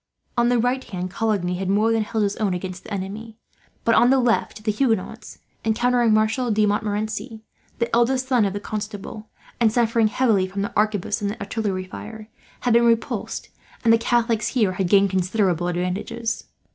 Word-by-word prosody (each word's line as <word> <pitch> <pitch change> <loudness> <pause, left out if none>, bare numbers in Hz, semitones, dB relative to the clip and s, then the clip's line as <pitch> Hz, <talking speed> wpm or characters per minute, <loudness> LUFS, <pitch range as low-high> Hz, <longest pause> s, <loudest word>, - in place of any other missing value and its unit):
On 240 0 +3
the 245 - +3
right, 250 +3 0 0.3
Coligny 195 -5 -1
had 190 -1 -2
more 210 +3 +3
than 225 -1 +2
held 215 0 -1
his 200 0 0
own 200 -4 0
against 185 0 -6
the - - -11
enemy; 205 +3 -5 0.5
but 230 - +3
on 240 +2 +5
the 270 - +5
left 235 -3 0
the 215 - +1
Huguenots, 225 -2 -2 0.3
encountering 240 +1 +2
Marshal 220 +3 +2
de 215 -1 +3
Montmorency, 215 +2 -2 0.3
the 235 -1 0
eldest 255 +2 +2
son 250 -4 +3
of 195 - -1
the 205 - -3
Constable, 210 +1 -6 0.3
and 230 -2 +4
suffering 230 -1 +2
heavily 210 -4 +2
from 195 +1 -3
the 205 - -4
arquebus 210 -1 0
and 205 0 -2
artillery 200 -2 -2
fire, 215 +3 -9 0.3
had 245 - +2
been 235 0 +5
repulsed; 230 -1 -1 0.3
and 225 -1 +5
the 230 - +4
Catholics 230 -2 +1
here 220 -7 +1
had 185 -1 -2
gained 200 0 +4
considerable 185 -2 +1
advantages. 180 +6 -3
215 Hz, 175 wpm, -23 LUFS, 200-230 Hz, 0.5 s, on